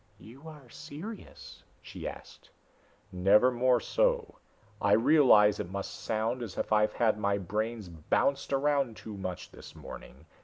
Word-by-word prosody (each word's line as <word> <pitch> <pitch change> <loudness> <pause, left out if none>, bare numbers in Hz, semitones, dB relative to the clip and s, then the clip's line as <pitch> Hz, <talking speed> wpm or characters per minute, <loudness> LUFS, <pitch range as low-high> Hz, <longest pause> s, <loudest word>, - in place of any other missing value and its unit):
"You 135 +8 -14
are 150 -5 -12
serious?" 175 - -10 0.2
she - - -8
asked. - - -11 0.6
"Never 100 +7 +4
more 125 0 +2
so. - - 0 0.4
I 100 - +3
realize 110 -4 +5
it - - -4
must 100 +1 -5
sound 115 +3 -2
as 110 -5 -7
if - - -1
I've 105 0 +3
had 110 -2 +1
my 100 -1 +1
brains 105 +3 -3
bounced 85 - -1
around 140 -4 +1
too 110 -2 -9
much 95 -2 -6
this - - -13
morning. 70 +4 -11
115 Hz, 145 wpm, -29 LUFS, 100-140 Hz, 0.6 s, realize